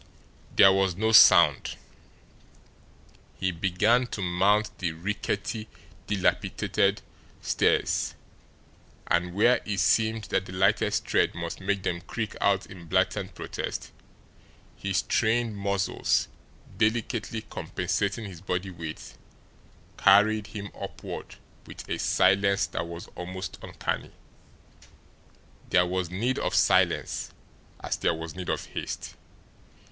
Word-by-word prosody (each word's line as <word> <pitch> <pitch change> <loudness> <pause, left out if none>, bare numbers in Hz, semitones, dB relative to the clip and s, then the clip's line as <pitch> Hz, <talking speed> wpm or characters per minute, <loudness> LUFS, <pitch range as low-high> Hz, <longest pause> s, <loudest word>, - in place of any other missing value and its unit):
There 95 - +8
was 95 -2 +1
no 110 +4 +1
sound. 110 - +7 1.6
He 95 - -1
began 100 +8 +2
to 100 - -5
mount 100 +5 +2
the 85 -3 -1
rickety, 105 +5 -3 0.4
dilapidated 100 -3 0 0.4
stairs; - - +1 0.9
and, 90 +1 0
where 120 +5 +4
it 100 -2 -3
seemed 110 +4 +2
that 95 - 0
the 95 - -9
lightest 95 +3 +2
tread - - +1
must 85 +2 -5
make 95 0 -1
them 85 -2 -2
creak 110 +4 -5
out 100 -1 +2
in 90 -3 -12
blatant - - 0
protest, - - -5 0.8
his 95 -2 -1
trained 115 0 +1
muscles, 100 -1 0 0.5
delicately 110 -1 0
compensating 95 +4 -2
his 90 -5 -9
body 95 0 -3
weight, 80 -3 -8 0.8
carried 105 +2 +5
him 100 -1 -7
upward - - -7 0.3
with - - -10
a - - -3
silence 100 +1 +3
that 85 - -4
was 85 0 -8
almost 95 +1 -7
uncanny. - - -4 1.6
There 90 -1 +4
was 90 -1 -2
need 115 +8 -1
of - - -1
silence, - - +2 0.5
as - - -2
there 85 - +1
was 80 0 -7
need 90 -1 -6
of - - -2
haste. - - -6
95 Hz, 115 wpm, -27 LUFS, 90-105 Hz, 1.6 s, There